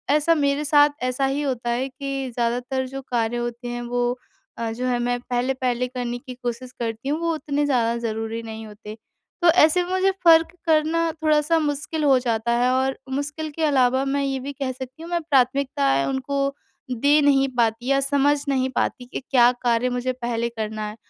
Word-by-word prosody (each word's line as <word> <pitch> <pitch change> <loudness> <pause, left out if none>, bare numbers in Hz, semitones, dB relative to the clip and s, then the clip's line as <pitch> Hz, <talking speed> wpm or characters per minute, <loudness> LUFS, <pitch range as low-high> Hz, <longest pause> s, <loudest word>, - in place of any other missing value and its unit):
ऐसा 305 +2 +3
मेरे 285 -1 +1
साथ 290 0 +5
ऐसा 255 +2 0
ही 270 +2 -1
होता 250 -4 -2
है 245 +3 0
कि 275 -1 -4
ज़्यादातर 245 +3 -1
जो 270 +1 -6
कार्य 235 -1 0
होते 240 +1 -4
हैं 240 0 -4
वो 245 +1 -1 0.4
अ, 230 -1 -2
जो 245 +3 -4
है 250 -1 +1
मैं 245 0 0
पहले-पहले 250 0 -1
करने 245 -1 -4
की 255 +1 -9
कोशिश 245 +1 -4
करती 230 +2 -3
हूँ, 300 +2 0
वो 335 0 0
उतने 295 -2 -1
ज़्यादा 235 -4 +1
ज़रूरी 225 +1 -3
नहीं 220 0 -7
होते। 210 0 -10 0.4
तो 345 - +4
ऐसे 335 +1 +5
मुझे 375 +2 +1
फ़र्क 330 -1 +7 0.2
करना 325 +1 +2
थोड़ा-सा 305 +1 +3
मुश्किल 300 +1 -2
हो 275 -3 +5
जाता 235 -2 -1
है 245 +1 +2
और 265 +1 0
मुश्किल 290 +3 -3
के 320 +2 -4
अलावा 260 -3 +3
मैं 280 +1 0
ये 270 -1 -1
भी 275 +2 -6
कह 275 -2 -3
सकती 260 +3 -9
हूँ, 335 - -8
मैं 345 -1 0
प्राथमिकताएँ 255 - +2
उनको 275 +1 -1 0.4
दे 285 +5 +3
नहीं 275 -1 +4
पाती 230 0 +1
या 275 0 +3
समझ 285 +1 +2
नहीं 260 -1 +1
पाती 245 - -1
कि 245 - -6
क्या 245 -2 +6
कार्य 240 0 +1
मुझे 250 +1 -2
पहले 235 -1 -2
करना 215 -2 -4
है। 210 - -9
260 Hz, 190 wpm, -23 LUFS, 240-285 Hz, 0.4 s, फ़र्क